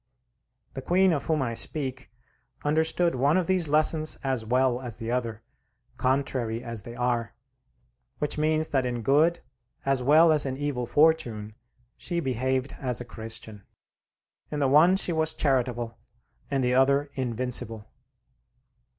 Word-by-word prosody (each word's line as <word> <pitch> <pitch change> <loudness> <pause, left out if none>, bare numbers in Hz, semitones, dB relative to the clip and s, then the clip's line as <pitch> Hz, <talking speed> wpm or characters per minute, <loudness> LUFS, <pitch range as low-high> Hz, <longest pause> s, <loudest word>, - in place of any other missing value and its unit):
The 135 - -6
Queen 185 +5 +3
of 145 - -2
whom 155 -4 0
I 115 -2 -2
speak 130 +2 -2 0.6
understood 160 +3 +2
one 140 +6 +2
of 185 - +1
these 185 -2 +2
lessons 155 +1 +2
as 130 -4 -1
well 125 +2 +1
as 120 -4 -6
the 115 0 -5
other, 115 -3 -3 0.5
contrary 130 -3 -1
as 115 -3 -2
they 120 +3 -10
are, 120 -2 -1 0.8
which 150 - -2
means 155 +1 +1
that 135 -2 +1
in 120 -2 -3
good 155 +7 +3 0.4
as 135 -1 +1
well 155 +5 +5
as 150 -2 +4
in 130 -1 -3
evil 140 -4 -3
fortune 120 -7 +2 0.4
she 175 -2 -3
behaved 130 -1 -1
as 125 -3 -1
a 120 - -6
Christian. 110 -2 -6 0.9
In 150 - -4
the 140 -2 +2
one 155 +7 +5
she 185 -2 0
was 160 0 0
charitable, 120 -4 -1 0.5
in 135 - 0
the 125 0 +1
other 140 +2 +3
invincible. 120 -3 -2
130 Hz, 145 wpm, -26 LUFS, 120-155 Hz, 0.9 s, well